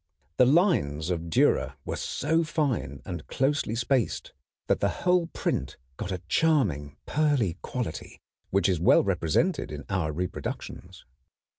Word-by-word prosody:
The 125 - +6
lines 95 - +2
of 85 -1 -3
Dürer 80 - +2
were - - -3
so 160 +4 0
fine 130 - -2
and 90 -2 -6
closely 135 -4 0
spaced 120 - 0 0.3
that - - +1
the - - +2 0.2
whole 180 -2 +3
print - - -2 0.2
got 95 - -4
a 90 -1 -4
charming 90 - +1
pearly 140 - +1
quality 125 -11 -5 0.3
which 100 -1 +2
is 90 -4 +1
well 85 - +5
represented 100 - 0
in 75 -2 -7
our 90 -6 0
reproductions. 90 +4 -5
100 Hz, 135 wpm, -27 LUFS, -, 0.3 s, The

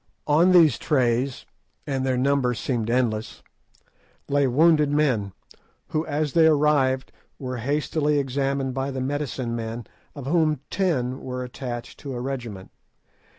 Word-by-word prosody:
On 160 +5 +4
these 165 -8 +6
trays—and 130 0 -2
their 130 -1 0
number 130 -1 +2
seemed 115 -2 -2
endless—lay 125 +4 -3
wounded 150 +3 +4
men, 130 -10 +1 0.6
who 155 +1 -1
as 150 -1 -1
they 165 -1 +6
arrived 145 -4 +2 0.3
were 130 -2 -5
hastily 150 +4 0
examined 135 -1 -1
by 135 +1 -2
the 135 -1 -4
medicine 130 -3 -2
men, 115 0 -5 0.3
of 140 -3 -7
whom 155 -2 +1
ten 135 -9 0
were 125 0 -4
attached 120 -1 -7
to 135 -3 -6
a - - -4
regiment. 120 -7 -5
135 Hz, 125 wpm, -24 LUFS, 125-150 Hz, 0.6 s, these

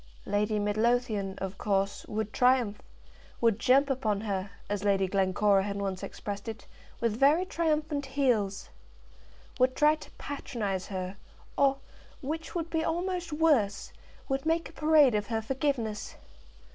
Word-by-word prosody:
Lady 210 +1 0
Midlothian, 210 -1 0
of 190 0 -5
course, 200 -1 -1
would 215 0 -3
triumph; 250 -5 +3 0.6
would 230 -2 +2
jump 275 +4 +4
upon 220 -7 0
her, 200 -2 -2 0.2
as 205 -1 -2
Lady 195 -2 +2
Glencora 195 +1 +3
had 200 +1 -3
once 195 -2 -3
expressed 205 0 -6
it, 225 -1 -6 0.3
with 230 -2 0
very 300 +7 +5
triumphant 305 -4 -1
heels, 240 -8 0 0.9
would 255 +1 +3
try 300 +1 +5
to 310 - -9
patronize 210 -9 -4
her, 185 0 -5 0.4
or, 275 -1 +3 0.4
which 315 +5 -5
would 335 -1 -3
be 320 -1 0
almost 350 +1 -2
worse, 290 -11 +2 0.3
would 270 -1 -1
make 325 +1 0
a - - -16
parade 305 -4 +5
of 205 -1 0
her 225 -1 -1
forgiveness. 235 -2 -2
230 Hz, 140 wpm, -29 LUFS, 205-285 Hz, 0.9 s, very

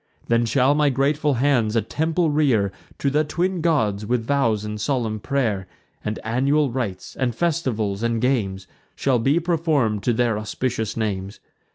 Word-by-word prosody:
Then 115 0 +3
shall 130 +4 +3
my 150 -1 +3
grateful 140 +2 +1
hands 120 -4 +2
a 115 - +3
temple 160 +1 0
rear 130 -10 +2 0.3
To 140 - 0
the 150 +2 +3
twin 175 +4 -1
gods, 110 -12 +1
with 115 +1 -1
vows 115 -6 +1
and 105 0 -5
solemn 115 -5 -1
pray'r; 110 -6 -1 0.4
And 105 0 -3
annual 135 +5 +1
rites, 115 -7 -4
and 125 -3 -1
festivals, 115 -11 -1
and 115 -1 0
games, 105 -7 0 0.3
Shall 130 -3 +1
be 140 +8 +2
perform'd 155 - +1
to 120 - +3
their 115 -2 +1
auspicious 110 0 -3
names. 100 -2 -3
125 Hz, 160 wpm, -23 LUFS, 110-145 Hz, 0.4 s, Then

